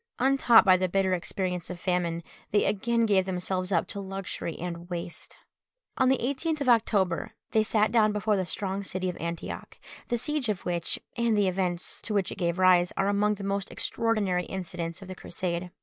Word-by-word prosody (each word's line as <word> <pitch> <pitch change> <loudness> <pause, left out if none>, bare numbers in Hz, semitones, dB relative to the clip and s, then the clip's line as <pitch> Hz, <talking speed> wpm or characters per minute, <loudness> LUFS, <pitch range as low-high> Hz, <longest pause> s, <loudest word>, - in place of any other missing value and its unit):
Untaught 260 -3 +5
by 185 -1 +7
the 185 0 0
bitter 190 0 +2
experience 180 -1 -2
of 180 -1 -6
famine, 175 -2 -1 0.3
they 205 - +3
again 230 +3 +1
gave 195 -3 +3
themselves 185 0 -2
up 170 -3 +2
to 200 - -4
luxury 195 -4 -5
and 175 0 -6
waste. 170 -2 -5 0.6
On 260 -2 +3
the 265 - +4
18th 285 +5 -1
of 270 - +1
October 215 -3 +2 0.2
they 220 - +4
sat 215 0 +2
down 220 -2 +4
before 210 0 +1
the 190 - 0
strong 195 +3 -2
city 185 -1 -2
of 180 - -5
Antioch, 170 0 -5 0.3
the 240 - 0
siege 295 -1 -1
of 200 -3 -2
which, 175 -2 -1 0.2
and 235 -2 +2
the 205 -2 +3
events 180 -1 -2
to 215 - -2
which 195 -3 +1
it - - -7
gave 170 -1 0
rise, 180 -1 +5
are 195 - +2
among 210 +1 +2
the 200 - -8
most 195 0 -2
extraordinary 205 -6 0
incidents 175 -1 -5
of - - -11
the 185 - -6
Crusade. 175 -1 -4
190 Hz, 195 wpm, -28 LUFS, 180-215 Hz, 0.6 s, by